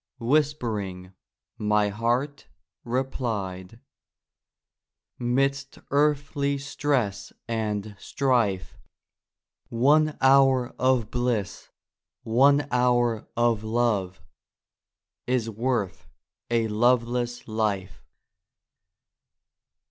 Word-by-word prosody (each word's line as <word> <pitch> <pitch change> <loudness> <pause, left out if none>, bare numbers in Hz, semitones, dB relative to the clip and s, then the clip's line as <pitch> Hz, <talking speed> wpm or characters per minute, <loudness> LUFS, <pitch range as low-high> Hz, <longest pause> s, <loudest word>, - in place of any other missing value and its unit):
Whispering, 115 -9 -1 0.5
my 105 -1 +2
heart 120 +7 -2 0.4
replied: 115 -6 -3 0.8
" - - -57
Midst 135 +3 -1
earthly 140 0 +1
stress 135 -8 -2 0.2
and 105 -2 -3
strife, 120 -10 0 0.9
One 150 +6 +3
hour 135 -2 +4
of 130 -4 +1
bliss, 120 -6 -2 0.5
one 140 +5 +3
hour 120 -2 +1
of 120 -2 +2
love, 105 -5 -1 1.0
Is 120 -3 0
worth 115 -3 -2 0.4
a 115 -1 +1
loveless 120 +2 0
life! 105 -4 -2
120 Hz, 70 wpm, -25 LUFS, 105-135 Hz, 1.0 s, hour